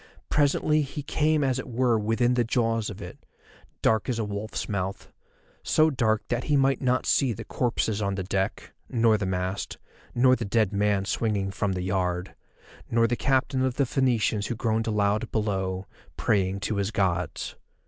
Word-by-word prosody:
Presently 150 +1 +3
he 145 +1 -5
came 155 +1 +1
as 130 -1 +1
it 130 - -6
were 120 -1 +2
within 115 +3 +1
the 125 -1 +2
jaws 115 -2 0
of 100 0 -8
it, - - -10 0.6
dark 110 +1 +2
as 120 - 0
a 115 - -1
wolf's 105 +1 -4
mouth, 100 -2 -4 0.5
so 155 0 +3
dark 110 -5 +1
that 120 +1 -1
he 150 - +2
might 135 0 +2
not 125 -1 +1
see 130 -4 +2
the - - -8
corpses 110 -3 -1
on 100 -1 -1
the 95 - -3
deck, 95 +1 -2 0.2
nor 115 -2 +3
the 100 -3 -1
mast, 95 +1 -3 0.4
nor 130 +1 +5
the 120 - -4
dead 105 -1 +1
man 100 -1 +1
swinging 100 -1 -1
from 100 0 -1
the 90 -1 -3
yard, 90 -1 -1 0.6
nor 115 0 +3
the 120 +1 +1
captain 130 0 +1
of 130 -1 0
the 140 - +2
Phoenicians 115 -5 +1
who 120 - -2
groaned 115 0 0
aloud 105 +1 +1
below, 95 -3 -1 0.3
praying 95 -1 +1
to 105 +1 -1
his 100 0 0
gods. 90 -6 -1
110 Hz, 180 wpm, -26 LUFS, 100-125 Hz, 0.6 s, nor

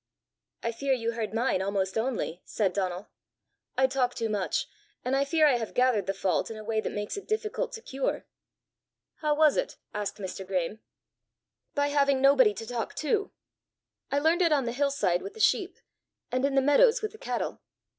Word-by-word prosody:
"I 230 - 0
fear 270 +4 0
you 230 -2 -1
heard 225 -2 -3
mine 225 -3 +1
almost 190 -1 -1
only!" 220 -7 -2
said 195 -4 -1
Donal. 185 -1 -3 0.7
"I 265 - +5
talk 260 -2 0
too 225 - -2
much, 205 -3 -1 0.4
and 255 +2 +1
I 275 - +3
fear 310 +2 +3
I 275 -5 +5
have 225 -2 -5
gathered 250 -7 +3
the 195 - +1
fault 185 -3 0
in 225 - -6
a 215 - -8
way 220 0 0
that - - -3
makes 205 - -4
it 400 - -8
difficult 440 +3 -1
to 450 -1 -7
cure." 270 0 -2 0.9
"How 300 -1 +1
was 305 -1 +4
it?" - - -2 0.2
asked 210 -1 -3
Mr. 190 -1 -5
Graeme. 185 +2 -2 1.0
"By 285 0 +2
having 280 -2 +3
nobody 265 -6 +5
to 225 - -6
talk 235 -1 -4
to. 405 +7 0 0.8
I 280 - +1
learned 320 +5 +3
it 335 -2 +4
on 280 -4 +3
the 235 - -1
hill 280 +4 +1
side 185 -10 +1
with 405 - -8
the - - -11
sheep, - - +2 0.5
and 255 +1 0
in 280 -1 0
the 270 - +5
meadows 450 - +5
with 430 - -2
the 435 - -14
cattle. - - -3
255 Hz, 195 wpm, -28 LUFS, 210-290 Hz, 1.0 s, I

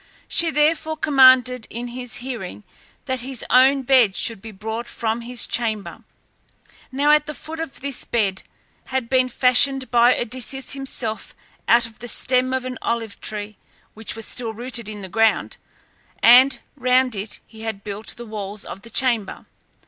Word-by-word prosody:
She 335 - +3
therefore 315 +1 +1
commanded 255 -5 +5
in 240 +2 -6
his 245 -1 -4
hearing 220 - -6 0.4
that 260 -1 -2
his 255 0 -3
own 265 +2 +5
bed 245 -6 +4
should 225 -4 0
be 225 - -9
brought 220 +3 -5
from 225 +1 -2
his 245 0 +1
chamber. 220 -4 -2 0.9
Now 295 +3 +4
the 300 0 -8
foot 320 +1 -8
of 325 -4 -6
this 280 -2 -2
bed 200 -5 -1 0.4
had 260 -3 -3
been 255 -1 +2
fashioned 260 +2 +2
by 240 +1 +5
Odysseus 255 +3 -3
himself 260 -5 -4 0.3
out 235 0 +5
of 225 -1 -11
the 240 - -7
stem 255 +1 +1
of 260 -1 -2
an 255 0 -5
olive 230 -3 -3
tree 210 -1 -5 0.4
which 220 0 -2
was 225 -1 -5
still 225 -3 -3
rooted 235 -1 -5
in 210 -2 -8
the - - -5
ground, 225 +3 +1 0.7
and 255 +2 +7 0.2
round 255 -1 +2
it 205 +2 -5
he 220 0 -14
had 220 -3 -5
built 210 +1 -4
the 240 - -8
walls 210 -2 -6
of 195 - -8
the 230 - -11
chamber. 235 -3 0
240 Hz, 165 wpm, -21 LUFS, 220-260 Hz, 0.9 s, and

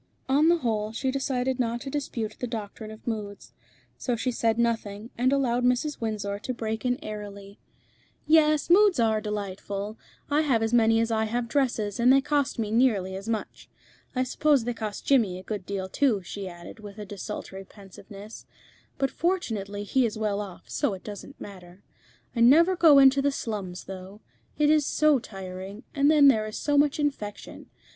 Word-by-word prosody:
On 290 +5 +4
the 345 - +4
whole, 220 -7 -1
she 260 +4 -1
decided 260 -1 -1
not 235 -1 0
to 270 -1 -6
dispute 230 -7 -3
the 250 - -3
doctrine 215 -1 -6
of 220 0 -12
moods. 210 -3 -5 0.5
So 245 - -1
she 250 +3 -1
said 230 -1 0
nothing, 225 -2 -1
and 250 +2 +2
allowed 250 -3 +1
Mrs. 250 +4 0
Windsor 205 -2 -3
to 255 +4 -4
break 220 -1 -3
in 250 -1 +1
airily 205 -2 -8 0.7
"Yes, 305 -1 +4
moods 380 -2 +5
are 220 -2 +2
delightful. 205 0 -5 0.3
I 295 +1 +2
have 255 -7 +1
as 225 +1 -1
many 225 -1 +4
as 230 0 0
I 220 0 +1
have 235 +2 -2
dresses, 230 -6 0
and 245 +2 +5
they 270 - +6
cost 285 0 0
me 215 -2 -2
nearly 215 -6 +2
as 195 +3 -6
much. 220 -2 -4 0.5
I 255 - +2
suppose 280 0 +2
they 245 +1 -2
cost 215 -3 -6
Jimmy 225 -10 +3
a 185 - -10
good 200 -2 -5
deal 195 -1 -3
too," 215 -1 +1
she 195 +2 -6
added, 175 +5 -11
with 205 -1 -10
a 210 - -6
desultory 195 -1 -7
pensiveness; 200 +2 -12 0.5
"but 270 -1 0
fortunately 215 - -2
he 250 +4 +2
is 215 - -6
well 210 -2 -1
off, 195 -4 -9
so 200 - -1
it 185 - -13
doesn't 210 +7 -9
matter. 185 -2 -11 0.5
I - - -2
never 320 +10 +6
go 325 -5 +7
into 275 0 +6
the 285 +1 +2
slums, 200 -9 -5
though. 190 +2 -9 0.4
It 300 0 +4
is 305 -1 +4
so 300 -1 +3
tiring, 195 +1 -8
and 285 0 +3
then 300 -2 +6
there 220 -5 +4
is 215 - -6
so 290 - 0
much 290 +1 +3
infection. 275 -9 -4
225 Hz, 185 wpm, -26 LUFS, 205-270 Hz, 0.7 s, go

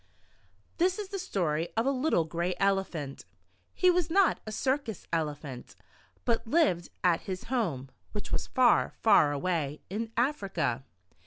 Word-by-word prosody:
THIS 365 +2 +3
is 415 -3 -5
the 395 -1 -4
story 170 - -1
of 225 - +2
a 275 - +3
little 260 - +2
gray 170 +3 -2
Elephant. 190 -8 -1 0.5
He 365 -1 +4
was 350 -2 +1
not 385 +2 +3
a - - -4
circus 260 -2 -1
Elephant, 150 -5 -3 0.5
but 230 -2 +1
lived 225 - +2
at 175 -2 +3
his 185 -1 -4
home, 145 - -1 0.2
which 210 - -6
was - - -1
far, 255 -2 +3
far 155 -9 +6
away 150 -1 -1
in 220 +3 -3
Africa. 195 - 0
195 Hz, 145 wpm, -29 LUFS, 160-270 Hz, 0.5 s, far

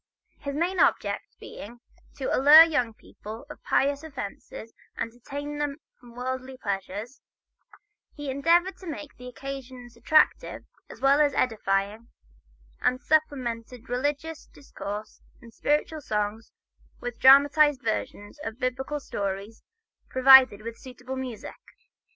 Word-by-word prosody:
His 280 -1 -5
main 355 +4 -1
object - - +2 0.2
being 235 +4 -10 0.4
"to 265 - -1
allure 295 +4 +9
young 295 -8 0
people 220 +5 -11
to 300 - -9
pious 280 +2 0
offices 230 -5 -8 0.2
and 230 - -3
to 240 - -22
detain 290 +3 -6
them 290 -1 -2 0.2
from 240 -1 -16
worldly 260 +1 -5
pleasure," 200 -1 -4 1.1
he 290 -2 -5
endeavored 340 +7 +2
to 375 - -12
make 300 -2 -7
the 250 - -10
occasions 255 -2 -8
attractive 305 +7 +2 0.2
as - - -12
well 275 +2 +4
as 290 -1 +2
edifying, 210 -1 -1 0.7
and 250 0 +1
supplemented 250 -6 -1
religious 290 +5 -3
discourse 210 -6 -8 0.2
and 230 -1 -15
spiritual 300 +4 -1
songs 210 -2 -3 0.5
with 245 -1 -6
dramatized 285 +1 +6
versions 215 +2 -4
of 225 0 -5
Biblical 265 +4 -3
stories 200 -3 -5 0.5
provided 260 -5 +7
with 230 0 -7
suitable 255 0 -8
music. 255 -4 -6
260 Hz, 125 wpm, -26 LUFS, 230-290 Hz, 1.1 s, allure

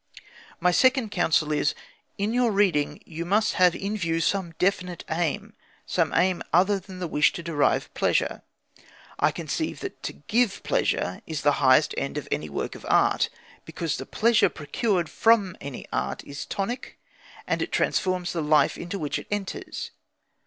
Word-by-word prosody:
My 180 - +3
second 255 +2 +3
counsel 155 -4 +2
is: 150 -1 +1 0.4
In 205 +3 -1
your 245 -2 +3
reading 190 -8 +1
you 165 0 -5
must 210 +5 +2
have 180 -1 +6
in 200 +2 -3
view 165 -5 -1
some 175 -1 -1
definite 180 -2 0
aim 160 -2 -1 0.3
some - - +1
aim 180 +1 +2
other 195 +4 +4
than 190 0 -11
the 180 -1 -3
wish 150 -1 +3
to 170 - -6
derive 160 -4 +1
pleasure. - - +1 0.8
I - - +4
conceive - - -3
that - - -7
to - - -4
give 225 +6 0
pleasure 90 - 0
is 155 -3 -4
the 145 - +5
highest 135 +3 +5
end 140 - -3
of 150 - -5
any 75 +1 -2
work 70 - -3
of - - -11
art, - - +3 0.3
because 165 -2 -3
the - - -7
pleasure 225 -1 +3
procured 175 +3 -1
from 210 -4 +3
any 140 -2 -7
art 65 +1 -2
is 140 0 -7
tonic, 215 +6 -4 0.5
and - - -1
transforms 185 -2 0
the 170 - -1
life 150 0 +3
into 180 +3 -4
which 150 -6 -2
it - - -11
enters. 205 -2 -4
175 Hz, 165 wpm, -26 LUFS, 155-200 Hz, 0.8 s, have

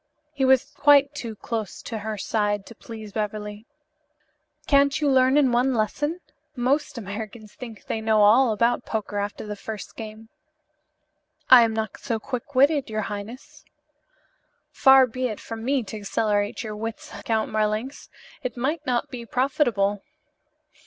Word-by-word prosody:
He 280 -2 -2
was 260 0 +3
quite 285 -1 +5
too 235 -6 -6
close 220 -2 -5
to 225 - -5
her 215 0 -4
side 205 0 -1
to - - -11
please 220 -2 -10
Beverly. 210 +1 -4 1.0
"Can't 280 0 +3
you 300 - +1
learn 260 0 +4
in 275 -4 +4
one 250 +2 +2
lesson? 295 - -1 0.3
Most 260 +2 0
Americans 215 +1 -7
think 230 -5 -10
they 220 - -3
know 220 -1 +3
all 230 +4 +5
about 235 +3 +1
poker 205 -2 -3
after 205 +1 -4
the 210 0 -5
first 210 0 -8
game." 220 0 -9 1.2
"I 255 -2 +11
am 225 -1 +2
not 220 -1 -3
so 230 -5 -2
quick 255 +3 -6
witted, 280 0 +3
your 215 0 -2
highness." 210 +5 -9 1.1
"Far 265 -1 +6
be 255 +1 -3
it 215 -4 -5
from 225 -1 -7
me 265 0 +1
to 215 +1 -7
accelerate 205 +3 -1
your 215 -1 -5
wits, 225 +1 -6
Count 220 -1 -1
Marlanx. 215 +5 -2 0.3
It 255 -3 -5
might 295 +6 -1
not 245 -2 0
be 245 -2 -6
profitable." 230 -6 +1
225 Hz, 150 wpm, -24 LUFS, 215-260 Hz, 1.2 s, I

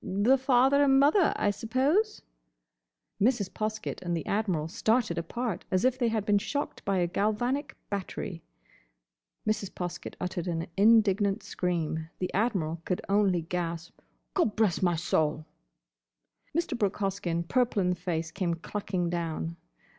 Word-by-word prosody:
"The 205 +7 +3
father 265 +2 +4
and 270 -1 +5
mother, 305 +6 +5
I 205 - +2
suppose?" 270 - +1 1.0
Mrs. 220 -3 +2
Poskett 215 0 -3
and 175 -1 -1
the 160 - -5
Admiral 190 -7 0
started 220 0 +1
apart, 225 +4 -3
as 185 +4 +1
if 255 0 +2
they 240 - +2
had 220 -2 0
been 205 -1 +3
shocked 285 +8 -3
by 195 -1 0
a 175 - +2
galvanic 240 - -1
battery. 185 -3 -4 1.1
Mrs. 215 -2 0
Poskett 175 -1 -6
uttered 180 -1 -3
an 165 -1 -1
indignant 205 -1 +4
scream; 160 -3 -2
the 185 - -3
Admiral 185 -7 0
could 180 - -2
only 195 -4 +3
gasp, 170 -1 -4 0.4
"Gobblessmysoul!" 175 -7 +1 1.1
Mr. 340 -6 0
Brooke 205 -4 0
Hoskyn, 185 -4 -2
purple 245 -2 +2
in 180 -2 +2
the - - 0
face, 165 -2 -3
came 170 -1 -1
clucking 180 0 -3
down. 165 -1 -3
195 Hz, 135 wpm, -29 LUFS, 175-225 Hz, 1.1 s, and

